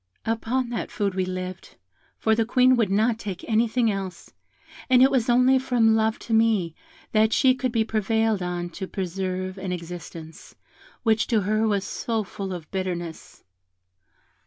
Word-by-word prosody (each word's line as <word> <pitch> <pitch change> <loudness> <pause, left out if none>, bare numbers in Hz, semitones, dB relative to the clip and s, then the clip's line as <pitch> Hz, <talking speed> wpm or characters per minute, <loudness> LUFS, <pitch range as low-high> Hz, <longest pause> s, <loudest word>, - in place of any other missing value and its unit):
Upon 235 +2 -1
that 235 - -3
food 200 -2 -1
we 185 0 -1
lived, 185 0 -6 0.4
for 220 - +2
the 225 +1 +2
Queen 255 +2 +4
would 225 -5 +1
not 220 +3 +2
take 195 -5 -6
anything 230 +1 +2
else, 195 -2 -6 0.6
and 255 0 +6
it 265 - +5
was 250 -3 +1
only 255 +2 +5
from 235 -4 +3
love 220 0 +1
to 230 - -3
me 220 -7 +2 0.4
that 220 0 +3
she 260 +1 +4
could 255 -1 -2
be 225 -1 +2
prevailed 220 -1 0
on 175 -1 -3
to 190 +2 -6
preserve 185 0 -4
an 190 -1 -4
existence, 165 -2 -8 0.5
which 225 -1 +2
to 225 -3 +2
her 215 +3 +1
was 200 -2 0
so 225 +1 -2
full 195 -1 -6
of 170 -4 -7
bitterness. 175 -4 -5
215 Hz, 160 wpm, -24 LUFS, 185-230 Hz, 0.6 s, and